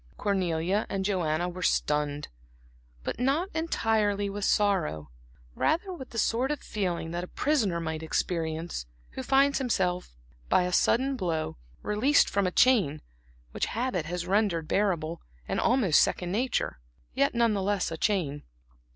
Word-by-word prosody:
Cornelia 185 0 0
and 195 -1 -2
Joanna 175 -4 0
were 180 +1 -6
stunned, 150 -3 0 0.8
but - - -4
not 280 +9 +1
entirely 220 -10 0
with 205 0 -3
sorrow; 80 - +1 0.4
rather 360 - 0
with 265 -7 -9
the 230 - -8
sort 235 +4 +1
of 295 -2 -1
feeling 175 -5 -3
that 175 +1 -3
a - - -6
prisoner 220 - 0
might 160 -1 -3
experience, 160 - -2 0.2
who - - -5
finds 275 +2 +3
himself 180 - -1 0.3
by - - +4
a 180 0 -2
sudden 265 +8 +3
blow, 165 - -2 0.3
released 250 +8 +3
from 200 -2 +1
a - - -1
chain 190 - +3 0.5
which - - -1
habit 235 -10 -1
has 175 0 -3
rendered 185 -4 +1
bearable, 170 -5 0 0.3
and - - -1
almost 230 - +4
second 180 -1 0
nature, 235 - -1 0.3
yet 140 - +1
none 235 -2 +3
the 200 - -1
less 195 -2 0
a - - -3
chain. 160 -8 0
190 Hz, 150 wpm, -28 LUFS, 165-230 Hz, 0.8 s, by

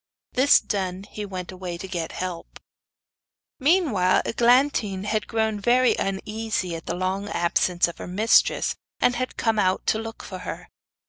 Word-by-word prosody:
This 265 +3 +6
done 190 -2 -3
he 210 +1 -7
went 185 -2 -6
away 180 -2 -6
to 190 - -7
get 170 -3 -4
help. 180 -2 -6 1.0
Meanwhile 270 - +3
Eglantine 235 -5 +2
had 215 +1 -1
grown 220 -2 0
very 245 +4 +4
uneasy 195 -2 -2
at 165 - -9
the 170 - -2
long 190 +3 -2
absence 175 0 +1
of 170 - -9
her - - -6
mistress, 210 +6 +3 0.3
and 245 - +3
had 255 +1 -3
come 225 -2 +1
out 185 -2 +1
to 220 - +1
look 225 0 -7
for - - -7
her. - - -7
200 Hz, 155 wpm, -24 LUFS, 185-225 Hz, 1.0 s, This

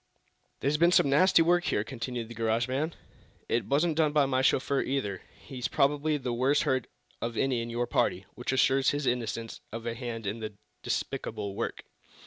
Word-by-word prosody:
"There's 140 +3 +1
been 170 +2 +5
some 140 -5 +4
nasty 165 +3 +5
work 175 +1 +3
here," 105 - +1
continued 120 0 -5
the 120 - -9
garage 115 +1 0
man. 145 +6 -2 0.5
"It 120 - 0
wasn't 155 +4 +2
done 155 -2 +3
by 150 -2 +4
my 130 -1 +1
chauffeur, 135 +1 +2
either. 105 -9 -2 0.2
He's 130 -3 -5
probably 150 +2 +2
the 125 -3 -3
worst 135 +5 +2
hurt 130 -2 0 0.3
of 115 0 -3
any 130 -3 +1
in 115 - -5
your 120 +1 -1
party, 95 -4 0
which 125 - -3
assures 135 0 +3
his 145 0 -1
innocence 115 -2 -2
of 115 +1 -6
a 115 - -1
hand 115 -2 -5
in 105 +3 -3
the 110 -1 -5 0.3
despicable 100 -1 -3
work." - - -4
130 Hz, 185 wpm, -29 LUFS, 115-145 Hz, 0.5 s, been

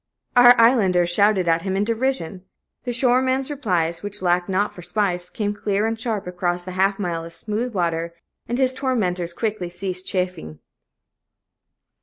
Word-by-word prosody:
Our 245 0 +8
islanders 190 -8 +4
shouted 200 -1 +3
at 165 0 +2
him 190 0 -2
in 200 - +1
derision. 225 -6 -1 0.4
The 245 - -1
shoreman's 260 +2 +1
replies, 180 - -1
which 205 -1 -5
lacked 175 +1 +1
not 195 +2 0
for 175 - -11
spice, 180 -2 -1
came 205 -2 -2
clear 205 0 -1
and 225 0 -2
sharp 225 -3 -3
across 180 0 -2
the 185 - -7
half 195 +2 +1
mile 170 -4 -3
of 165 0 -10
smooth 225 +2 -3
water, 170 -1 -1 0.3
and 240 - -2
his 260 -1 +2
tormentors 190 -11 -1
quickly 210 -4 -3
ceased 185 +1 -3
chaffing. 180 - -3
195 Hz, 160 wpm, -22 LUFS, 175-230 Hz, 0.4 s, Our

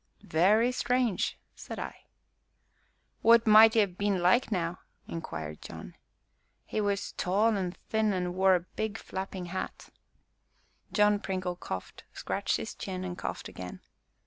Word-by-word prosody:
"Very 210 +9 +3
strange!" 245 -4 0 0.2
said - - -8
I. - - -7 1.2
"What 230 0 +6
might 220 +1 +8
'e 220 - +6
'ave 200 - -3
been 200 0 0
like, 185 +8 +3
now?" 175 -2 -1 0.3
inquired 80 - -6
John. - - -9 0.7
"He 215 - -2
was 200 -1 -1
tall 210 +5 +2
and 185 -2 -3
thin, 220 -1 +2
and 180 -2 -1
wore 190 0 +5
a 175 - 0
big 205 +4 -4
flapping 190 -1 -5
hat." 190 - -5 1.0
John 210 -1 +4
Pringle 185 -2 -3
coughed, 95 - -7
scratched - - -1
his - - -5
chin, 185 -1 -5
and 180 -1 -4
coughed - - -5
again. - - -8
195 Hz, 140 wpm, -29 LUFS, 180-215 Hz, 1.2 s, might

